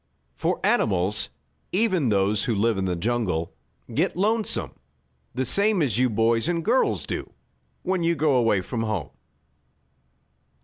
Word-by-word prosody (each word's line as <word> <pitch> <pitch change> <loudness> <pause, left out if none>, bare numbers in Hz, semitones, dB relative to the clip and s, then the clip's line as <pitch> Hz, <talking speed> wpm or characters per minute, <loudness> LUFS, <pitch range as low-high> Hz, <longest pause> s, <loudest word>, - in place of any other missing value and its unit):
For - - -1
animals, 100 +1 +2 0.4
even 185 - +1
those 100 0 +1
who 115 - 0
live 110 0 +1
in 95 - -1
the 90 -1 -1
jungle, 90 -4 -1 0.4
get - - 0
lonesome, 215 +3 0 0.6
the 130 +1 -1
same 200 - +3
as 120 -5 0
you 130 0 +3
boys 115 +5 +1
and 170 -2 -1
girls 245 +4 +1
do - - -5 0.5
when 185 -1 0
you 170 0 +2
go 150 -1 +2
away 115 -6 +3
from 115 +5 -4
home. 110 -2 -3
120 Hz, 140 wpm, -24 LUFS, 105-170 Hz, 0.6 s, same